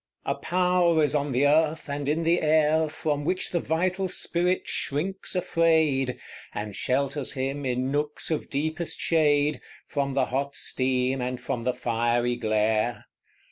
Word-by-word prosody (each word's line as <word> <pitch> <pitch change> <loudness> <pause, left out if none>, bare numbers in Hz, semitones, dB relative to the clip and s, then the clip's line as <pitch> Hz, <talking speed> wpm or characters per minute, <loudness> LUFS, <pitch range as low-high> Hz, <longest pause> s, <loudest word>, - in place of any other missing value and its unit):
A - - +1
power 180 -2 +2
is 145 -1 +1
on 145 -1 0
the 130 +3 +2
earth 155 +2 +2
and 140 0 -3
in 160 +3 0
the 170 +2 +2
air 155 0 +3
From 150 -1 -2
which 180 +4 -1
the 175 - +1
vital 180 +4 0
spirit 180 0 0
shrinks 185 +8 -2
afraid, 160 -7 +2 0.4
And 105 -1 -4
shelters 140 +2 -1
him, 135 0 -3
in 125 +1 -1
nooks 150 +2 -2
of 155 - -2
deepest 155 +4 -2
shade, 150 -2 +2 0.2
From 140 -2 -2
the 135 -2 +3
hot 140 +3 -2
steam 130 0 0
and 125 0 -3
from 120 -1 -4
the 125 - +1
fiery 120 0 0
glare. 110 0 0
145 Hz, 150 wpm, -26 LUFS, 130-160 Hz, 0.4 s, air